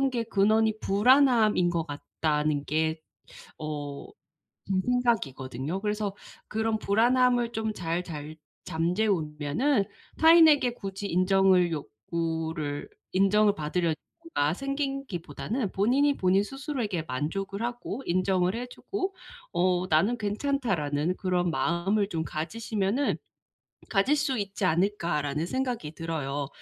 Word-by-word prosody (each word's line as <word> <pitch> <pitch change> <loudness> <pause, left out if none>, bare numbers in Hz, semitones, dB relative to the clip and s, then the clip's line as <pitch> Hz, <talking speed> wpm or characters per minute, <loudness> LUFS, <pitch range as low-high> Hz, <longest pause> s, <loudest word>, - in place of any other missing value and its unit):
그런 270 0 +2
게 240 -2 -1
근원이 220 +1 +2
불안함인 220 -3 +4
것 170 -2 -1
같다는 150 0 -1
게 160 +1 0 0.6
어 145 -2 -5 0.6
제 - - -1
생각이거든요. 180 - -1
그래서 210 -1 -1 0.3
그런 220 0 0
불안함을 240 +3 +3
좀 220 -1 -2
잘 170 -1 -2
잘 155 -2 -7 0.3
잠재우면은 175 - 0 0.3
타인에게 320 -6 +6
굳이 195 -2 -6
인정을 185 -1 +3
욕구를 160 +3 -3 0.2
인정을 200 +2 +4
받으려든가 160 - -2
생기기보다는 270 - -3
본인이 275 +8 +2
본인 185 +1 +3
스스로에게 260 - -3
만족을 195 - -3
하고 240 0 -4
인정을 185 +1 +1
해 245 +1 -4
주고 385 +9 -4 0.4
어 180 0 +2
'나는 195 +10 +3
괜찮다.'라는 200 - -1
그런 180 -2 0
마음을 195 +6 +1
좀 165 -5 -2
가지시면은 210 - -1 0.7
가질 225 +9 +3
수 285 -3 0
있지 200 -1 -3
않을까라는 170 -4 0
생각이 245 - -3
들어요. 145 -4 -3
195 Hz, 275 characters per minute, -28 LUFS, 160-235 Hz, 0.7 s, 타인에게